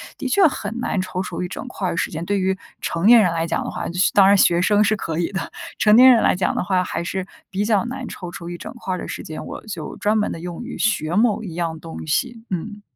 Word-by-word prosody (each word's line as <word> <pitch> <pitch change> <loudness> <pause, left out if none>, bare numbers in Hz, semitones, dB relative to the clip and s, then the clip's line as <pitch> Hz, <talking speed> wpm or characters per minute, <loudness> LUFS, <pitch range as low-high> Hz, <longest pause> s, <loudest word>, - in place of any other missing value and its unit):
的 275 - -4
确 375 +8 +4
很 240 -5 -1
难 200 -5 -1
抽 185 0 -3
出 - - -5
一 180 - -2
整 255 - -7
块 195 -6 -3
儿 170 - -2
时 - - -1
间， 160 +1 -4
对 200 +2 0
于 190 0 +1 0.3
成 170 +5 0
年 235 -1 +9
人 180 -5 +3
来 165 0 -1
讲 - - -1
的 - - -5
话， - - -4
学 180 +2 +1
当 195 -1 +6
然 200 0 +6
学 175 -1 +4
生 210 +2 +4
是 215 +1 +2
可 165 -5 -4
以 175 - -1
的， 190 - -4 0.3
成 210 0 +5
年 255 +2 +9
人 230 - +5
来 - - +3
讲 180 - 0
的 - - 0
话 185 -1 +1
还 170 - -3
是 190 +1 -3 0.2
比 195 +2 -1
较 210 -2 +2
难 255 0 -5
抽 180 -2 -7
出 170 0 -8
一 175 0 -5
整 - - -8
块 190 -6 -4
儿 - - -4
的 - - -6
时 - - -6
间， 155 - -7
我 - - -8
就 160 -6 -6
专 215 +1 +1
门 210 - 0
地 - - -7
用 175 +4 -6
于 - - -7
学 175 -6 0
某 220 0 +2
一 180 - -6
样 165 -1 -3
东 165 -1 -8
西， 235 - -1
嗯。 205 +3 -4
190 Hz, 300 characters per minute, -21 LUFS, 175-215 Hz, 0.3 s, 年